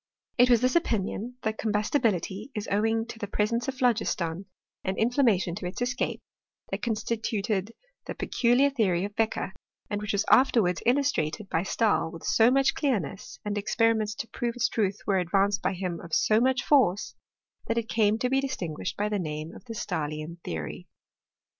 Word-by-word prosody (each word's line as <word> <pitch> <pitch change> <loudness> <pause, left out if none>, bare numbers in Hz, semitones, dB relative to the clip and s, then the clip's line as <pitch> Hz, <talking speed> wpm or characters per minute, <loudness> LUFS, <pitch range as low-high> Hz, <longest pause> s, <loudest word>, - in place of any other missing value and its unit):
It 250 +1 +6
was 240 -2 +5
this 255 0 +2
opinion 235 - -1
that 220 0 -2
combustibility 210 - 0
is 210 - -3
owing 225 +2 +1
to 230 - -9
the 205 - -4
presence 230 +5 0
of 270 - -2
phlogiston, 200 -8 0 0.4
and 190 +1 -2
inflammation 225 -7 +2
to 180 0 -4
its 180 - -6
escape, 245 +1 -2 0.5
that - - -3
constituted 215 -2 -1 0.4
the - - -4
peculiar 255 +4 +2
theory 195 -8 +1
of 205 0 -7
Beccher, 220 -3 0 0.4
and 205 0 -1
which 210 0 -2
was 200 +1 +1
afterwards 225 -9 +4
illustrated 230 - +1
by 165 - +1
Stahl 205 -1 +1
with 165 0 -10
so 225 +1 +4
much 270 +1 +3
clearness, 210 - -2
and 205 0 -1
experiments 220 0 +1
to 230 - -5
prove 240 -1 -3
its 245 - +1
truth 205 -3 0
were 195 -2 +2
ad 180 - -2
vanced 195 +2 +2
by 190 - 0
him 180 -2 -3
of 165 - -3
so 215 0 +4
much 260 +1 +2
force, 230 -9 +3 0.5
that 230 - 0
it 230 -1 -1
came 215 -1 +2
to 250 - 0
be 270 0 +3
distinguished 185 - -4
by 210 - 0
the 210 -1 -1
name 155 -1 -4
of - - -13
the 230 -2 -7
Stahlian 160 -3 -4
theory. 80 -3 -5
215 Hz, 180 wpm, -27 LUFS, 190-240 Hz, 0.5 s, It